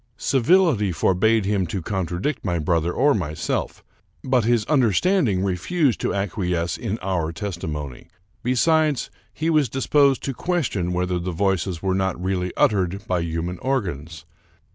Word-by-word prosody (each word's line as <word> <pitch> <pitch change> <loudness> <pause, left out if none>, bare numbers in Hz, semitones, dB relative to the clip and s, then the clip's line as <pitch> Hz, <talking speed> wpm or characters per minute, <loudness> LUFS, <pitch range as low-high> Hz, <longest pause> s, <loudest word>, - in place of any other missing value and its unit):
Civility 135 - +3
forbade 100 +5 +2
him 100 -3 0
to 95 - -3
contradict 95 - -3
my 90 -3 -1
brother 85 +1 0
or 140 +9 +3
myself, 80 -6 -3 0.4
but 130 -2 +2
his 115 -2 +2
understanding 130 - +2
re 95 -2 0
fused 140 - 0
to - - 0
acquiesce 90 -4 -1
in 110 -2 -3
our 90 -4 -1
testimony. 80 -7 -5 0.3
Besides, 150 +3 +1 0.2
he 160 +2 -1
was 150 -4 +3
dis 135 - -3
posed 140 -3 +3
to 135 - -2
question 125 - -1
whether 90 0 -1
the 90 +2 -4
voices 95 -1 -1
were 95 -1 +1
not 95 -2 -1
really 90 0 -1
uttered 95 0 +1
by 90 -4 0
human 85 +2 -3
organs. 85 - -3
95 Hz, 145 wpm, -23 LUFS, 90-130 Hz, 0.4 s, Civility